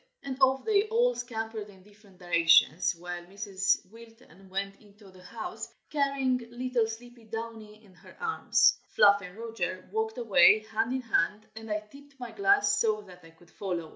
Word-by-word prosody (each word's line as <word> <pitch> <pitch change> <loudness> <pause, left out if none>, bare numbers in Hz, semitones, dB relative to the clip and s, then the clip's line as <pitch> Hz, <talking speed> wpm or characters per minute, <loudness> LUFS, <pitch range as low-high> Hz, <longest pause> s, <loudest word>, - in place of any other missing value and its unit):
And 275 -1 -4
off 265 0 +3
they 425 -1 +2
all 480 +3 +2
scampered 225 - -5
in 190 -2 -17
different 205 -1 -21
directions, 170 -2 +4
while 175 0 -6
Mrs. 195 0 -1
Wilton 225 -4 -17
went 195 +1 -4
into 205 -1 -18
the 185 0 -17
house, 235 - -7 0.2
carrying 275 -3 +1
little 245 -1 -1
sleepy 235 +1 -10
Downy 220 -1 -8
in 190 - -20
her - - -17
arms. 455 -2 +2 0.2
Fluff 200 0 +6
and 180 0 -11
Roger 185 -6 -4
walked 220 +2 -2
away 220 -2 +5
hand 225 +2 0
in 260 0 -1
hand, 215 -2 0
and 225 0 -9
I 210 0 -1
tipped 280 +6 -18
my 245 -2 -7
glass 400 0 +3
so 215 -2 +1
that 180 -3 -15
I 165 - -14
could 165 +1 -22
follow. 175 -5 -4
220 Hz, 170 wpm, -28 LUFS, 195-245 Hz, 0.2 s, Fluff